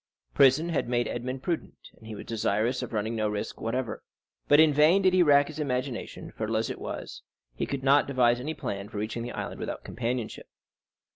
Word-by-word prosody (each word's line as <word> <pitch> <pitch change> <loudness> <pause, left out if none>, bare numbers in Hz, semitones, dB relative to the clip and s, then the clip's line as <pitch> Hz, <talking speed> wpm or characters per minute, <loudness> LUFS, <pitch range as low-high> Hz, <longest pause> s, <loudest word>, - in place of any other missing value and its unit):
Prison 140 - +5
had 155 -7 -1
made 120 -1 +1
Edmond 130 +2 -4
prudent, 170 -2 -4
and 110 - -15
he 110 - -6
was - - -8
desirous 115 +2 0
of - - -5
running 110 +1 -2
no 110 -1 0
risk 105 0 -4
whatever. 120 +2 -2 0.5
But 145 - +6
in 155 -2 +6
vain 155 +7 +5
did 185 -1 +4
he 185 - +5
rack 145 -3 +6
his 155 0 -8
imagination; 130 -3 -3
fertile 110 0 -2
as 110 - -1
it - - -8
was, - - -6 0.3
he - - -3
could 140 -1 -4
not 140 +2 +4
devise 125 -3 +3
any 155 +5 -4
plan 100 0 -5
for 110 - -8
reaching 110 +3 -3
the 120 +1 -5
island - - -5
without - - -5
companionship. 120 -1 -4
125 Hz, 205 wpm, -28 LUFS, 110-145 Hz, 0.5 s, But